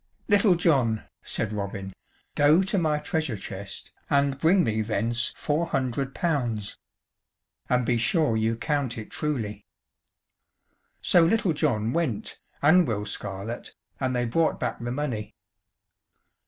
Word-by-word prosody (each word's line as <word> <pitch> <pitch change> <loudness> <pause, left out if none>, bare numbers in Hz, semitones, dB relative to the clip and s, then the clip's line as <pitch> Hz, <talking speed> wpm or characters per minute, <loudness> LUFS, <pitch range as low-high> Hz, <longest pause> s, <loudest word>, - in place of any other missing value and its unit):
"Little 205 -3 +5
John," 130 -11 +2 0.2
said 110 -2 -2
Robin, 100 -1 -4 0.4
"go 150 +5 +5
to 195 +1 0
my 155 -3 +1
treasure 155 - -2
chest, 100 +1 -7 0.2
and 140 -1 +2
bring 175 +4 +4
me 110 -4 0
thence 115 +2 0
four 160 +3 0
hundred 135 -2 -2
pounds. 120 - -1 0.9
And 125 -1 +2
be 120 0 +1
sure 150 0 +2
you 110 +1 +1
count 140 -1 -1
it 110 - -8
truly." 110 -9 -3 1.4
So 175 - +6
Little 200 0 +2
John 120 -7 0
went, 150 -11 -2 0.2
and 165 +3 +6
Will 105 -3 -2
Scarlett, 100 +3 -5 0.2
and 130 -1 -1
they 120 0 +1
brought 160 +8 +1
back - - -2
the 120 0 -4
money. 125 -6 -3
130 Hz, 130 wpm, -26 LUFS, 110-160 Hz, 1.4 s, So